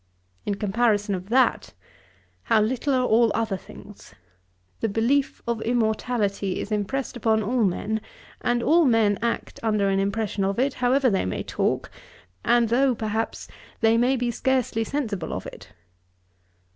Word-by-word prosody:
In 205 - 0
comparison 210 0 +1
of 185 +1 -5
that, 255 +1 +2 0.7
how 220 - +4
little 245 +6 0
are 255 -1 +2
all 230 -1 +4
other 225 -3 0
things! 200 +2 -13 0.6
The 225 - 0
belief 245 +7 0
of 235 -2 -1
immortality 220 -4 0
is 205 - -5
impressed 215 +7 -2
upon 220 -2 +1
all 235 +3 +1
men, 210 +3 -1 0.4
and 240 0 +1
all 330 +1 +4
men 225 -5 +3
act 235 0 -3
under 210 -3 +1
an 195 0 +1
impression 200 0 -1
of 195 +1 -1
it, 265 +2 +1
however 255 +1 +2
they 190 - 0
may 95 - -3
talk, - - -1 0.5
and 240 -2 +3
though, 255 +2 +3
perhaps, 220 0 -3 0.3
they 225 0 +4
may 245 +3 +3
be 245 -1 -1
scarcely 250 -2 0
sensible 220 - -3
of - - -5
it.' - - -11
225 Hz, 150 wpm, -24 LUFS, 205-245 Hz, 0.7 s, how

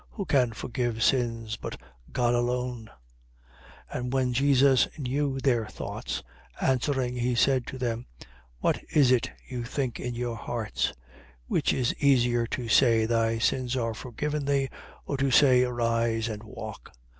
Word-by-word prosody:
Who 200 - -4
can 130 -6 +3
forgive 120 0 -2
sins, 115 -4 +1
but - - -7 0.3
God 120 -1 +1
alone? 120 -1 -1 1.0
5:22. - - -2
And 125 0 -3
when 130 -2 +1
Jesus 135 0 +4
knew 140 0 -1
their 120 -5 +1
thoughts, - - -5 0.4
answering 130 -1 0
he 125 0 0
said 130 +1 +2
to 130 - -6
them: 120 -1 -3 0.5
What - - +1
is 140 -4 +4
it 125 -2 +2 0.2
you 125 -2 -4
think 125 0 -3
in 125 -1 -4
your 120 -1 -3
hearts? 115 0 -2
5:23. - - -6 0.6
Which - - +2
is 125 -2 0
easier 120 -4 +3
to 120 0 -4
say: 115 0 +4
Thy 115 0 +1
sins 125 +2 0
are 115 -2 -1
forgiven 140 +7 -3
thee; 140 -1 +1 0.4
or 140 - -2
to 135 0 +1
say: 130 0 +6
Arise 115 -2 0
and 105 -1 -5
walk? 110 0 -9
125 Hz, 155 wpm, -27 LUFS, 115-130 Hz, 1.0 s, say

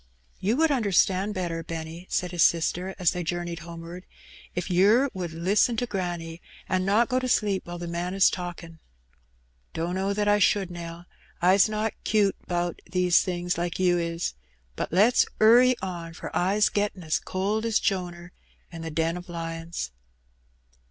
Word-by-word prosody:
" - - -35
Tou 210 +5 +2
would 320 +2 +3
understand 200 -4 +2
better, 170 -3 -3
Benny/' 165 +2 -7
said 180 -1 -1
his 175 -2 -1
sister, 175 +4 +2
as 180 -3 +3
they 180 - -3
journeyed 175 0 -3
homeward, 170 +2 -9 0.5
"if 180 -1 -2
yer 210 +10 +4
would 180 -2 -4
Usten 190 +8 +1
to 245 - 0
granny, 175 -5 -4 0.3
an' 185 0 0
not 215 +4 +3
go 255 - +1
to 255 - -3
sleep 205 -7 +1
whiles 175 0 -6
the 175 - -4
man 175 +2 -3
is 195 - +5
talkin'." 175 -2 -7 1.0
"Dunno 185 +4 -1
that 205 0 0
I 205 0 +4
should, 195 -2 +2
Nell. 170 0 -8 0.3
I's 190 +4 +5
not 215 +1 -1
'cute 205 -2 +2
'bout 175 0 -2
those 180 -1 +4
things 175 -1 -2
like 175 0 -2
you 180 -1 +3
is; 170 0 -2 0.4
but - - -3
let's 210 +8 +4
'urry 245 +4 +6
on, 170 -3 -5
for - - -7
I's 200 +4 +3
gettin' 205 -3 -2
as 155 -1 0
cold 200 +4 -2
as 225 -2 +2
Jonar 175 -2 -2 0.4
in 165 -1 -8
the 165 - -4
den 165 +2 -1
o' - - -10
lions." 165 - -5
180 Hz, 170 wpm, -26 LUFS, 170-200 Hz, 1.0 s, urry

